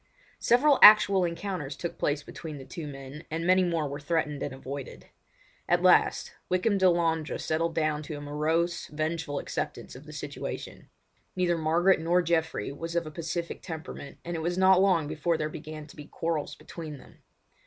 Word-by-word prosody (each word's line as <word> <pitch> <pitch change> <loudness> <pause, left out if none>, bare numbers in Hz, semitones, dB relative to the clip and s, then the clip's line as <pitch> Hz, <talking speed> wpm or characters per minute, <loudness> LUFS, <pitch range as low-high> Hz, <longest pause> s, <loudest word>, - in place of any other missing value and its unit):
Several 275 +4 +4
actual 205 -3 +9
encounters 170 -4 -4
took 170 +4 -6
place 145 0 0
between 155 0 -8
the 135 - -10
two 165 -1 -7
men, 135 +2 -9
and 165 +2 -3
many 185 +1 +5
more 165 -4 0
were 140 +1 -5
threatened 150 -2 -1
and 145 - -3
avoided. 135 +1 -7 0.6
At - - +3
last - - +4 0.2
Wykham 195 +3 +2
Delandre 170 -4 +2
settled 165 +1 -1
down 155 -2 0
to 155 0 -6
a - - -8
morose, 160 +4 -1
vengeful 155 -1 -3
acceptance - - -4
of - - -12
the - - -9
situation. - - -6 0.5
Neither 180 -2 +2
Margaret 165 +4 +3
nor 175 +2 +2
Geoffrey 160 -9 0
was 165 +4 -6
of 170 -1 +1
a 155 - -7
pacific 170 +2 -4
temperament, 160 -3 -8
and 175 0 -3
it 160 - -3
was 175 +2 -1
not 190 0 +6
long 180 -6 +3
before 155 +2 0
there 155 0 -2
began 155 0 -8
to 150 - -15
be 150 - -9
quarrels 165 -1 -3
between 155 -4 -8
them. - - -17
160 Hz, 175 wpm, -28 LUFS, 150-175 Hz, 0.6 s, actual